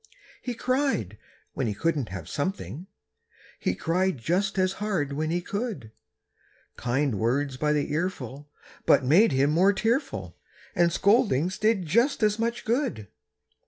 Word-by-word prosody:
He 245 -2 -4
cried 255 - -1 0.3
when - - -1
he 105 - -2
couldn't 145 0 -1
have 95 -4 -7
something; 150 - -4 0.7
He 90 - -1
cried 180 - 0
just 185 - 0
as 185 0 +2
hard 170 -10 -1
when 155 +2 -2
he 175 +2 0
could; 200 - -4 0.8
Kind 125 -3 0
words 130 +4 0
by 150 +3 0
the 150 -1 0
earful 145 -4 -3 0.4
but 130 - +5
made 180 - +5
him 135 +2 +2
more 185 +6 +4
tearful, 230 +7 -1 0.3
And 175 -1 +3
scoldings 190 - +2
did 215 -4 +2
just 235 - +2
as 210 0 +2
much 235 +1 -2
good. 230 - -1
170 Hz, 140 wpm, -26 LUFS, 135-210 Hz, 0.8 s, but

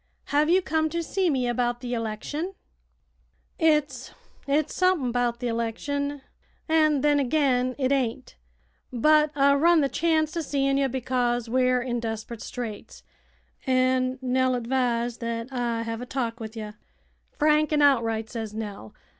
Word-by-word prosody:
"Have 300 +2 +3
you 370 +2 +4
come 315 -1 0
to 335 +1 -2
see 370 +2 0
me 260 -4 0
about 240 0 0
the 245 0 -5
election?" 240 - -4 1.0
"It's 300 -6 +1 0.4
it's 290 +2 +1
sump'n 365 -9 +2
'bout 240 -1 0
the 245 -1 -2
'lection, 280 +5 -3 0.4
an' 310 -3 +3
then 290 0 +3
agin 255 -2 +1
it 265 -1 0
ain't. 260 -1 -1 0.6
But 300 +4 +4
I 280 0 +4
run 325 +3 +4
the 275 - +1
chanct 315 -1 +1
o' 335 - 0
seein' 275 -2 0
ye, 275 - +2
because 245 -2 -1
we're 255 -1 +2
in 240 -1 -2
desprit 225 0 -5
straits, 230 -4 -7 0.6
an' 255 0 +2
Nell 255 0 +1
advised 240 -1 -1
that 230 +2 -4
I 235 -2 -1
hev 230 0 -4
a 250 - -7
talk 240 -3 -3
with 220 0 -8
ye. 215 -1 -5 0.7
'Frank 305 0 +3
an' 295 -1 +3
outright,' 225 -5 +2
says 220 -3 -5
Nell. 205 - -7
255 Hz, 150 wpm, -25 LUFS, 235-290 Hz, 1.0 s, you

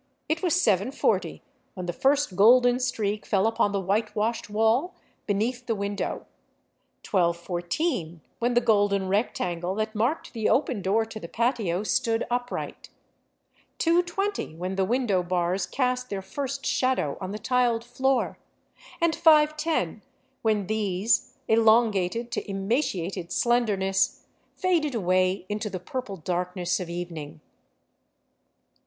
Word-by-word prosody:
It 315 +2 -1
was 360 -1 +2
7 205 - +2
140 270 - -1 0.3
when 185 -2 -5
the 175 - -3
first 275 - +1
golden 245 +5 +6
streak 215 -5 -1
fell 195 0 +1
upon 225 -2 +2
the 200 - 0
whitewashed 210 +4 -1
wall 225 - +1 0.3
beneath 235 +5 -1
the 225 - 0
window; 200 0 -3 0.8
12:14 175 - -1 0.2
when 240 +1 0
the 240 - +5
golden 205 -4 +2
rectangle 180 -3 -1
that 215 +1 -2
marked 235 +9 -1
the 225 -3 0
open 250 -6 +1
door 210 +4 +1
to 220 0 -8
the 170 - -8
patio 225 -5 0
stood 225 +1 0
upright; 245 0 -3 0.9
2 335 +1 +3
:20 390 - -3
when 180 +3 -4
the 190 0 +1
window 225 -4 +1
bars 180 +1 -1
cast 250 -1 -1
their 195 -1 -4
first 275 +6 -4
shadow 255 - +1
on 185 - -4
the 205 - -4
tiled 240 0 +1
floor; 260 +2 0 0.6
and 335 -1 +2
5 305 -1 +5
:io 205 - 0 0.4
when 215 -3 +1
these, 210 0 0
elongated 225 -1 +3
to - - -4
emaciated 195 - -2
slenderness, 205 -6 +1 0.3
faded 330 - +1
away 185 -1 +1
into. 210 +2 -3
the 185 -2 -5
purple 205 +1 -5
darkness 180 +2 -2
of 180 -2 -5
evening. 170 -4 -6
215 Hz, 130 wpm, -26 LUFS, 185-245 Hz, 0.9 s, golden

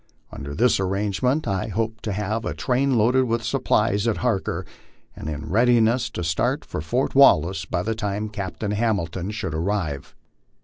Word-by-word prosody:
Under 70 +1 -7
this 120 -2 +3
arrange 100 +1 -1
ment 135 +5 +1
I 95 -2 -1
hoped 110 +1 -3
to 110 - -1
have 105 +3 -2
a - - -3
train 130 0 +1
loaded 125 +4 +3
with 115 -1 -1
supplies 110 -3 +1
at 115 - +1
Harker, 115 -6 -1 0.5
and 75 - -6
in 75 -1 -5
readiness 120 +2 +3
to 90 - -5
start 80 0 0
for - - -5
Fort 120 - -1
Wallace, 90 - +5
by 85 +1 -2
the 115 - -1
time 105 -1 -3
Captain 100 0 -4
Hamilton 100 -5 -1
should 105 -7 -4
arrive. 80 -4 -2
105 Hz, 170 wpm, -23 LUFS, 95-115 Hz, 0.5 s, Wallace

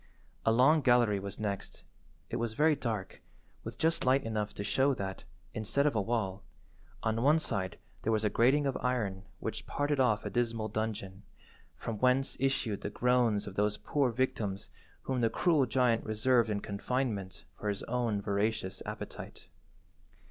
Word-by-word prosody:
A - - +6
long 135 +7 +5
gallery 120 -5 +4
was 100 0 -6
next. 100 -2 -4 0.5
It - - -1
was 115 -1 -2
very 155 +3 +4
dark, 110 -8 -4 0.4
with - - -7
just 165 +1 +1
light 130 +2 +3
enough 110 -2 -2
to 100 - -4
show 135 +5 +2
that, 95 -3 -5 0.3
instead 110 +6 0
of 150 - +3
a 105 - +2
wall, 100 -3 -1 0.6
on 110 +1 0
one 145 +5 +5
side 95 -11 -2 0.2
there 115 - 0
was 110 -1 +1
a 105 - +3
grating 135 +7 +4
of 135 - 0
iron 105 -7 -1
which 110 - -5
parted 145 0 0
off 120 -5 +2
a - - -3
dismal 115 -2 0
dungeon, 105 -3 -3 0.6
from 110 -3 -4
whence 130 +1 +2
issued 130 -6 0
the - - -3
groans 120 -3 +2
of 100 - -7
those 105 +1 +1
poor 140 -3 +1
victims 110 -5 -2 0.3
whom 130 -2 -1
the 115 - +3
cruel 155 -4 +2
giant 120 -1 +2
reserved 115 +2 +2
in 105 -1 -1
confinement 105 -2 -2
for 105 - -3
his 100 -1 -2
own 115 -4 -1
voracious 100 -1 -1
appetite. - - -7
115 Hz, 165 wpm, -31 LUFS, 105-130 Hz, 0.6 s, A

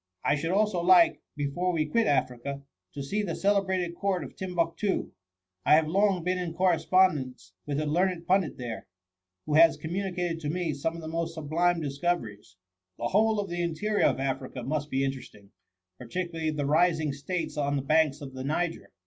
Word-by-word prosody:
I - - +4
should 150 +3 -1
also 200 -1 +1
like, 175 -1 +5
before 150 +5 -1
we 160 -3 0
quit 220 +9 +1
Africa, 140 +1 -1 0.3
to 140 - -4
see 205 +10 -1
the 175 -5 -3
celebrated 190 -3 +1
court 190 -3 -1
of 135 - -10
TimbuQtoo. 180 +1 -1 0.5
I - - +6
have 160 0 +4
long 195 +1 +2
been 180 +1 0
in 170 -2 -4
correspon 185 +1 +4
dence 130 -9 -9
with 145 0 -1
a 155 - -1
learned 175 +3 0
pundit 185 -2 +1
there, 120 -3 -6 0.6
who 150 - -2
has 160 0 +6
communicated 175 +1 -3
to 150 -3 -4
me 170 -1 -1
some 160 +4 -2
of 165 - -8
the - - -6
most 165 +1 -3
sublime 165 +3 +1
discoveries. 140 - -3 0.2
" 90 0 -58
The 120 - -2
whole 215 +2 +3
of 200 - -2
the 175 -1 -3
interior 175 +6 +1
of - - 0
Africa 135 -1 -3
must 145 +3 -2
be 135 0 0
interesting, 125 -7 -7 0.5
particularly 165 +5 -3
the 150 -2 -2
rising 155 0 +2
states 160 +3 -4
on 145 -1 0
the 135 - -1
banks 150 0 +2
of 135 -2 -8
the 130 0 -6
Niger. 165 +4 -2
165 Hz, 185 wpm, -28 LUFS, 140-180 Hz, 0.6 s, I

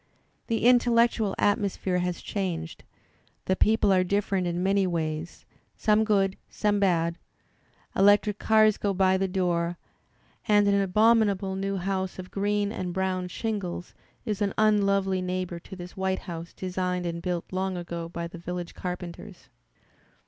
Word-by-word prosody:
The 230 -1 0
intellectual 235 -4 +4
atmosphere 200 -3 +1
has 180 -1 -3
changed, 170 -5 -4 0.6
the 190 - +1
people 215 -1 +3
are 185 -1 +4
different 195 -1 0
in 175 +1 -1
many 195 0 +2
ways, 160 -1 -3 0.3
some 215 0 +3
good, 195 -3 +1
some 205 -1 0
bad; 170 -3 +1 0.8
electric 205 +1 +4
cars 215 -1 +4
go 200 -2 0
by 190 0 +3
the 195 0 0
door, 175 -2 0 0.7
and 205 -1 +4
an 200 0 +3
abominable 200 -1 +3
new 195 0 -2
house 190 0 -2
of 185 0 -8
green 205 0 0
and 180 -4 -4
brown 185 -1 -1
shingles 190 -3 -4 0.3
is 210 -3 -2
an 200 -1 0
unlovely 200 -3 +2
neighbour 180 -1 -3
to 190 - -11
this 180 -1 -9
white 190 0 -1
house 170 -2 -6
designed 180 -1 -3
and 170 0 -3
built 175 -1 -2
long 190 0 -1
ago 170 -1 -5
by 170 0 -5
the 170 0 -10
village 175 0 -5
carpenters. 180 +1 -7
190 Hz, 145 wpm, -27 LUFS, 180-205 Hz, 0.8 s, intellectual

